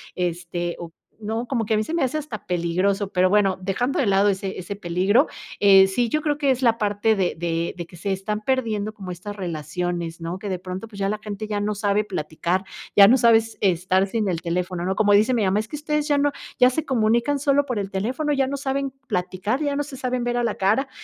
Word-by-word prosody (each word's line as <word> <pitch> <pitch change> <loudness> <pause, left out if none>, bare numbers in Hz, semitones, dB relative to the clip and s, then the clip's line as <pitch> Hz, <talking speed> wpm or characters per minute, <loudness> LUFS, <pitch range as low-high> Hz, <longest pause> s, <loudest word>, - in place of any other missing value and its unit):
este, 175 -1 -3
o 170 -1 -7 0.3
no, 225 +3 -3
como 235 -4 -1
que 220 - +1
a - - +2
mí 215 - +1
se 325 - -5
me 335 -5 +1
hace 265 +4 0
hasta 275 -9 -6
peligroso, 185 +3 0
pero, 185 -1 +2
bueno. 195 -2 +3
Dejando 240 +10 -1
de 265 - +2
lado, 195 +1 +3
ese 195 -1 -1
ese 185 +3 -5
peligro, 195 - +2 0.3
eh, 195 -1 +7
sí 230 +4 0
yo 305 +4 0
creo 295 -1 0
que 280 -2 +2
es 260 0 -1
la 230 -2 +3
parte 210 0 +1
de 190 -3 0
de 165 0 -2
de 170 - -5
que 175 - -15
se 195 +4 -3
están 210 +3 -2
perdiendo 220 -5 -1
como 190 -4 -8
estas 185 +4 -7
relaciones, 175 0 -3
¿no? 170 +3 -5
Que 205 0 -5
de 185 -2 -2
pronto, 185 +4 -7
pues, 200 -2 -11
ya 195 - 0
la 210 +1 -1
gente 210 0 -5
ya 205 -1 -2
no 210 +1 -1
sabe 205 0 +1
platicar, 180 0 -2 0.3
ya 200 -1 +10
no 245 - +6
sabes 225 -2 +3
estar 185 +1 +2
sin 215 0 -1
el 170 -3 -1
teléfono, 175 +1 -2
¿no? 190 +1 -1
Como 205 -1 +4
dice 215 +5 +4
mi 225 -4 +1
mamá: 195 +3 +2
"Es 215 - -4
que 300 - -5
ustedes 300 0 -1
ya 290 - +3
no 285 0 +2 0.3
ya 250 - +7
se 295 +4 -2
comunican 235 +3 +1
solo 285 0 +2
por 250 -6 -2
el 195 -1 -4
teléfono, 255 +10 -1
ya 270 -1 +1
no 280 +1 -3
saben 275 0 -2 0.2
platicar, 190 +8 -2
ya 285 -1 -1
no 290 - 0
se 280 -2 -9
saben 255 -2 -2
ver 240 0 -1
a 240 - +1
la 230 - 0
cara". 220 +8 +1
205 Hz, 245 wpm, -23 LUFS, 185-245 Hz, 0.3 s, ya